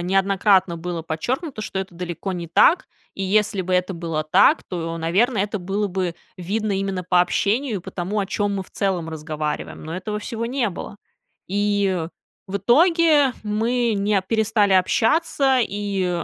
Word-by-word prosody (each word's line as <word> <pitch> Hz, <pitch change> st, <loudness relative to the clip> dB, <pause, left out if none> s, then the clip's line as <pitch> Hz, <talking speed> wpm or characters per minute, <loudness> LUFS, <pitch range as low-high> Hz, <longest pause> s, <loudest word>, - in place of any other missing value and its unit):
неоднократно 190 Hz, 0 st, +2 dB
было 170 Hz, 0 st, -4 dB
подчеркнуто, 240 Hz, -, -3 dB
что 195 Hz, -, -4 dB
это 190 Hz, -2 st, -5 dB
далеко 180 Hz, +2 st, -4 dB
не 170 Hz, -2 st, -5 dB
так. 315 Hz, -, +4 dB, 0.3 s
И 195 Hz, -, -4 dB
если 200 Hz, 0 st, +1 dB
бы 185 Hz, +1 st, -1 dB
это 180 Hz, +1 st, 0 dB
было 165 Hz, -2 st, -3 dB
так, 290 Hz, -, +4 dB
то, 165 Hz, -2 st, -4 dB
наверно, 200 Hz, +9 st, +1 dB
это 205 Hz, +2 st, -1 dB
было 200 Hz, +3 st, -1 dB
бы 185 Hz, -2 st, -2 dB, 0.2 s
видно 205 Hz, +4 st, -2 dB
именно 195 Hz, -1 st, -2 dB
по 180 Hz, 0 st, +3 dB
общению, 215 Hz, +7 st, 0 dB
и -, -, -5 dB
по -, -, -9 dB
тому, 190 Hz, +4 st, -3 dB
о 200 Hz, -, 0 dB
чём 200 Hz, +1 st, -1 dB
мы 195 Hz, -, -2 dB
в -, -, -20 dB
целом 185 Hz, -5 st, -1 dB
разговариваем. 155 Hz, -1 st, -4 dB
Но 160 Hz, -, -5 dB
этого 210 Hz, +3 st, -4 dB
всего 230 Hz, +2 st, -4 dB
не 245 Hz, -2 st, 0 dB
было. 200 Hz, +2 st, -7 dB, 0.5 s
И 200 Hz, -3 st, 0 dB, 0.4 s
в 200 Hz, -, -2 dB
итоге 295 Hz, -, +4 dB
мы 230 Hz, +2 st, 0 dB
не 200 Hz, 0 st, +1 dB
перестали 215 Hz, -1 st, +2 dB
общаться 265 Hz, -, +3 dB
и 195 Hz, -4 st, -2 dB
195 Hz, 165 wpm, -22 LUFS, 180-215 Hz, 0.5 s, так